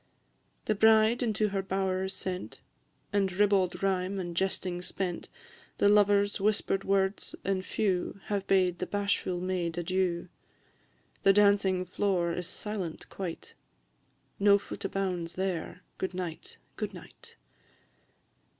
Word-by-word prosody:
The - - +2
bride 220 +2 +5
into 215 -3 +1
her 195 -1 -1
bower 190 0 -1
is 190 - -4
sent, 185 -1 -5 0.5
And 195 -2 +2
ribbald 190 -2 +2
rhyme 190 0 0
and 175 -2 -4
jesting 185 -1 -1
spent; 180 -1 -3 0.5
The 200 - +4
lover's 205 -1 +4
whisper'd 200 -1 +1
words 195 0 0
and 190 -1 0
few 190 -1 -1
Have 200 -2 -2
bade 185 -2 +3
the 180 - -2
bashful 200 -3 -1
maid 175 -2 -2
adieu; 175 0 0 0.9
The 195 - +6
dancing 200 -2 +4
floor 180 -2 0
is 180 0 -3
silent 190 -3 -4
quite 180 -4 -6 0.9
No 200 0 +6
foot 200 - -6
bounds 180 -4 -2
there, 180 -1 -3 0.2
Good 185 -1 -3
night, 175 -3 -6 0.2
good - - -4
night! - - -13
190 Hz, 125 wpm, -29 LUFS, 180-200 Hz, 0.9 s, The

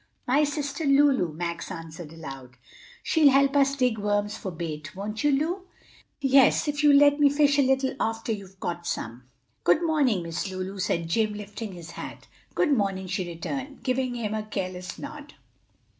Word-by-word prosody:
"My 275 +4 +4
sister 290 +1 -3
Lulu," 275 - +4
Max 170 +1 -4
answered 165 -1 -8
aloud. 135 -6 -10 0.5
"She'll 310 -3 +5
help 275 +1 +3
us 275 -1 +4
dig 250 -5 +1
worms 205 0 0
for 195 - -5
bait, 155 -3 -6
won't 210 +5 -4
you, 295 - +4
Lu?" 340 +7 -1 0.5
"Yes, 275 +2 +4
if 295 0 -1
you'll 290 -1 +7
let 290 0 +5
me 290 -1 +6
fish 285 0 +3
a - - +7
little 265 0 +1
after 225 +1 -1
you've 195 -3 -6
caught 175 -1 -4
some." 120 +2 -4 0.4
"Good 175 - +4
morning, 280 - +2
Miss 170 +3 -3
Lulu," 190 +1 -5
said 170 -2 -1
Jim, 215 +4 +1
lifting 210 0 -7
his 170 -2 -10
hat. - - -8 0.3
"Good 300 -5 +3
morning," 195 -4 -1
she 185 0 -2
returned, 265 - -6
giving 255 -1 0
him 220 -3 -3
a 215 - -1
careless 185 -4 -5
nod. 295 0 -9
220 Hz, 175 wpm, -26 LUFS, 180-280 Hz, 0.5 s, you'll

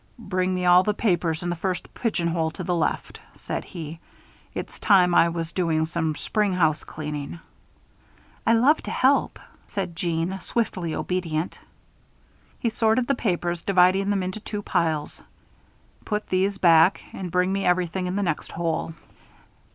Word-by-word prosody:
"Bring 185 -4 -1
me 180 0 -1
all 180 0 +7
the 210 +2 0
papers 175 -6 0
in 175 - -1
the - - -1
first 185 +1 -3
pigeon 185 -8 -1
hole 165 -1 0
to 165 +3 -7
the 180 - -1
left," 165 -2 -1 0.2
said - - -4
he. 165 -3 -8 0.6
"It's - - -6
time 180 -4 +5
I 170 -1 +5
was 165 -1 -4
doing 165 -3 +1
some 160 -1 -2
spring 210 +2 0
housecleaning." 155 -2 -2 1.1
"I 230 - +6
love 265 +7 +4
to - - -7
help," 270 +2 +2 0.3
said 185 -4 -4
Jeanne, 170 +2 -1
swiftly 185 -7 -2
obedient. 170 -2 -2 1.0
He 230 - -1
sorted 225 +2 +2
the 275 - +1
papers, 175 -7 -1
dividing 190 +1 +3
them 200 -2 +1
into 185 +3 -4
two 210 -1 -5
piles. 160 -6 -1 0.8
"Put 210 -1 -3
these 195 +2 +1
back, 170 0 +5
and 185 -2 -5
bring 180 +2 +1
me 195 0 -1
everything 180 +1 +1
in 180 - -2
the 205 - 0
next 170 -5 -2
hole." 165 -1 -2
180 Hz, 155 wpm, -24 LUFS, 165-195 Hz, 1.1 s, all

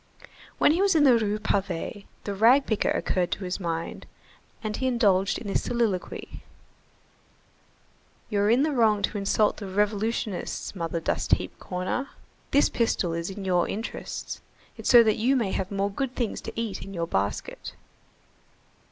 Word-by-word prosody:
When - - +5
he 340 +4 +2
was 395 -3 +3
in 305 - +5
the 260 -4 +7
Rue 210 -2 +1
Pavée, 200 -1 -2 0.2
the 205 - -3
rag 235 +7 +5
picker 220 - 0
occurred 180 -2 0
to 195 - -6
his 180 +1 -3
mind, 165 -2 -4 0.6
and 215 -1 -2
he 260 - -1
indulged 200 -6 +2
in - - -8
this 200 - 0
soliloquy:— 230 -7 -2 1.9
"You're 205 -1 +1
in 245 +5 +4
the 310 - +1
wrong 220 -6 +3
to 210 - 0
insult 205 +1 +2
the 200 - -6
revolutionists, 210 0 -1
Mother 165 -2 -2
Dust 160 - 0
Heap - - 0
Corner. 185 +9 -3 0.4
This 285 - +4
pistol 200 -7 0
is 170 +2 -3
in 195 0 -7
your 180 -2 +2
interests. 220 +3 -5 0.3
It's - - -3
so 240 -2 +9
that 215 -2 +2
you 250 +5 +2
may 225 -7 0
have 190 -1 -2
more 200 0 -1
good 260 +4 -3
things 235 -4 -2
to - - -6
eat 220 -5 -3
in 195 0 -8
your 170 -1 -1
basket." 100 -8 -3
205 Hz, 165 wpm, -26 LUFS, 190-235 Hz, 1.9 s, so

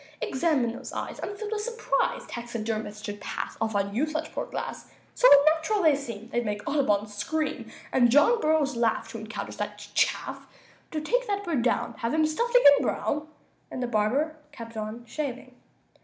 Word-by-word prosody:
"Examine 265 -5 +1
those - - -8
eyes. - - -5
I'm 405 - -5
filled 425 +1 -5
with 430 -1 -1
surprise 465 +1 -1
Taxidermists 220 -3 -4
should 205 -1 -6
pass - - -4
Off 220 -1 0
on 200 0 0
you 270 +8 +1
such 310 0 -4
poor - - -3
glass; - - -6 0.2
So - - +5
unnatural 315 +8 +5
they 310 -3 +6
seem 235 -6 -7
They'd 240 0 0
make 210 -2 -4
Audubon 265 -8 +2
scream, 215 +10 -3 0.2
And 245 -2 +4
John 295 - +5
Burroughs 305 -3 +2
laugh 235 -1 +1
To 230 - -6
encounter 215 +1 -6
such - - -6
chaff. - - 0 0.4
Do 310 - -3
take - - 0
that 405 -1 -1
bird 330 -9 0
down; 240 - 0
Have 230 +6 -1
him 315 0 +4
stuffed 470 +11 -1
again, 285 - +8
Brown!" 300 +1 -1 0.4
And 255 - -4
the - - +1
barber 245 +8 +1
kept 230 -4 -10
on 220 +2 -5
shaving. 255 0 -5
270 Hz, 180 wpm, -27 LUFS, 225-315 Hz, 0.4 s, again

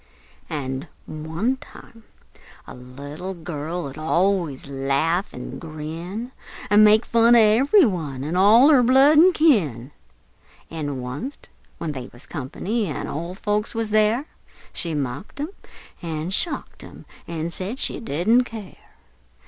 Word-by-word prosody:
An' 135 0 -4 0.2
one 160 +12 -2
time 230 -4 -15 0.6
a - - -10
little 145 +9 -8
girl 165 0 -5
'ud 140 +2 -8
allus 170 -2 0
laugh 140 +7 0
an' - - -8
grin, 165 +9 -6 0.4
An' 210 +1 +7
make 215 +2 +5
fun 235 +1 +5
of 235 - +7
ever' 260 - +5
one, 150 -9 -4
an' 155 +4 -3
all 220 +9 +6
her 280 -5 +6
blood 270 +5 +6
an' 365 +3 +7
kin; 170 - +2 0.8
An' 145 -5 -4
wunst, 145 - -7 0.3
when 160 - -3
they 130 -3 -7
was 120 - -13
"company," 190 - -3
an' 150 - -4
ole 170 +5 -5
folks 210 +2 -2
wuz 225 -1 -2
there, 215 +5 +3 0.5
She 165 -3 -1
mocked 140 - -5
'em 295 +3 -2 0.5
an' 165 0 -4
shocked 330 - -2
'em, - - -13 0.2
an' 165 0 -4
said 195 +8 -4
she - - -2
didn't 225 - +2
care! 220 -5 -11
180 Hz, 140 wpm, -23 LUFS, 150-225 Hz, 0.8 s, An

